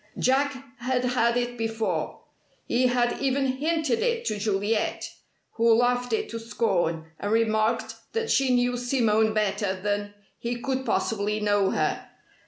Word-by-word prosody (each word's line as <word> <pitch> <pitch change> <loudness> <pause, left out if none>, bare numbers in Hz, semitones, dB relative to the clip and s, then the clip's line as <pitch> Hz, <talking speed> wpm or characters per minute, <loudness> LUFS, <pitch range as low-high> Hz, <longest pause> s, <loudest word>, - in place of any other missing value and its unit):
Jack 275 +2 +2 0.2
had 250 0 0
had 240 -1 +2
it 245 0 -2
before. 225 0 -2 0.4
He 255 +2 +2
had 245 -1 +1
even 270 0 +1
hinted 315 - 0
it 470 0 0
to 215 -2 -1
Juliet, 210 +1 -1 0.4
who 230 0 +3
laughed 245 +1 +1
it 220 - 0
to 230 - -5
scorn, 185 -8 -1
and 205 - -3
remarked 220 0 +1 0.2
that 455 0 -1
she 270 -1 +3
knew 245 0 +2
Simone 225 -3 +2
better 200 -2 0
than 205 +1 -2 0.2
he 235 +1 -2
could 265 +1 -2
possibly 210 -1 0
know 205 -2 +2
her. - - -1
235 Hz, 145 wpm, -26 LUFS, 215-255 Hz, 0.4 s, who